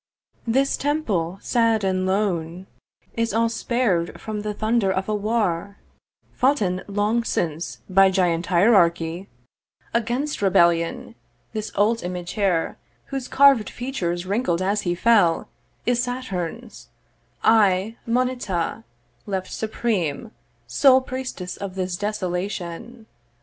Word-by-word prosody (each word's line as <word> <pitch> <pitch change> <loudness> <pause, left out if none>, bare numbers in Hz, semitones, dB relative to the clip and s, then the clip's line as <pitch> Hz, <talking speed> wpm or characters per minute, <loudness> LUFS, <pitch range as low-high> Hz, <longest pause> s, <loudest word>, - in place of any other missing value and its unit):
'This 270 +4 +2
temple, 210 - -1
sad 230 -3 +2
and 185 -1 0
lone, 185 -3 -1 0.5
'Is 230 -2 -1
all 230 0 +3
spar'd 225 -7 -1
from 215 -1 -5
the 210 0 -3
thunder 215 -1 +1
of 190 0 -2
a 215 - -1
war 200 -3 -1 0.6
'Foughten 210 -9 +1
long 210 +3 0
since 165 -6 -3
by 195 0 +5
giant 175 -3 +1
hierarchy 175 -2 +3 0.6
'Against 245 +5 -1
rebellion: 170 -1 +2 0.4
this 215 -1 -4
old 220 +3 +2
image 180 0 -5
here, 190 -6 0 0.3
'Whose 270 -2 -3
carved 270 -7 +5
features 185 -9 -3
wrinkled 195 -3 0
as 205 +2 +1
he 175 -3 -1
fell, 205 -5 +3 0.4
'Is 240 0 +2
Saturn's; 245 -10 -5 0.5
I 210 -1 +3
Moneta, 235 - -1 0.4
left 190 -2 -3
supreme 215 -4 -2 0.3
'Sole 265 -2 +5
priestess 255 -8 -5
of 195 -2 -6
this 185 -1 -2
desolation.' 200 +2 -4
205 Hz, 115 wpm, -23 LUFS, 180-230 Hz, 0.6 s, by